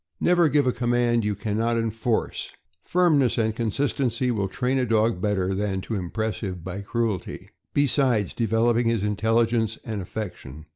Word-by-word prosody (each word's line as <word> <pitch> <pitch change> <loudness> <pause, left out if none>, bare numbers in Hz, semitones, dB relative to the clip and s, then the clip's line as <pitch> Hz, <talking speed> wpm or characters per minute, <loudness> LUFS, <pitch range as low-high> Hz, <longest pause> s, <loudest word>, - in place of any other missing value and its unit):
Never 175 -2 +4
give 145 0 +3
a 125 - +3
command 120 -1 +1
you 105 0 0
can 105 0 -3
not 115 +1 +1
enforce. 115 +1 -1 0.3
Firmness 155 -8 +2
and 110 -1 +1
consistency 125 +1 0
will 100 -4 -1
train 125 +6 -1
a 125 - +1
dog 110 -3 +2
better 95 -2 0
than 95 -1 -1
to 115 - -6
impress 110 +3 -2
him 95 -5 -5
by 95 +3 -5
cruelty, 110 -2 -3 0.2
besides 130 -7 +2
developing 115 +1 +2
his 115 -3 +1
intelligence 115 +2 +1
and 110 -3 -3
affec 105 +1 -5
tion. 75 +4 -11
115 Hz, 160 wpm, -25 LUFS, 105-120 Hz, 0.3 s, Never